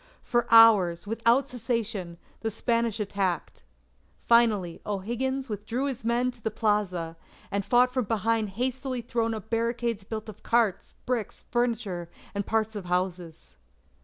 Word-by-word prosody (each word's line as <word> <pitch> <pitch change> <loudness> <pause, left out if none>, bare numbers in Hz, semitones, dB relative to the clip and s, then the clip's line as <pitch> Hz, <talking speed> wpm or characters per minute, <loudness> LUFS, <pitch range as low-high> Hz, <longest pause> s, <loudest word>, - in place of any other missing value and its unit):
For 240 -1 0
hours, 205 -7 +7
without 235 +5 +2
cessation, 225 -8 -3 0.2
the 225 - -2
Spanish 230 0 0
attacked. 195 -4 -2 0.6
Finally, 215 -7 +3
O'Higgins 240 +7 -2
withdrew 225 +5 -3
his 265 -5 -3
men 240 +2 +1
to 245 -2 -18
the 220 - -1
plaza, 200 -6 -1 0.3
and 200 0 0
fought 250 +4 +3
from 255 -3 0
behind 225 0 0
hastily 255 0 -2
thrown 230 -1 -1
up 220 +1 -9
barricades 230 -1 -1
built 215 +2 -6
of 215 -1 -10
carts, 230 -5 +1
bricks, 240 -5 -3
furniture, 225 -8 -1 0.2
and 200 -1 -3
parts 220 -1 0
of 200 -3 -5
houses. 180 - -3
225 Hz, 135 wpm, -27 LUFS, 200-240 Hz, 0.6 s, hours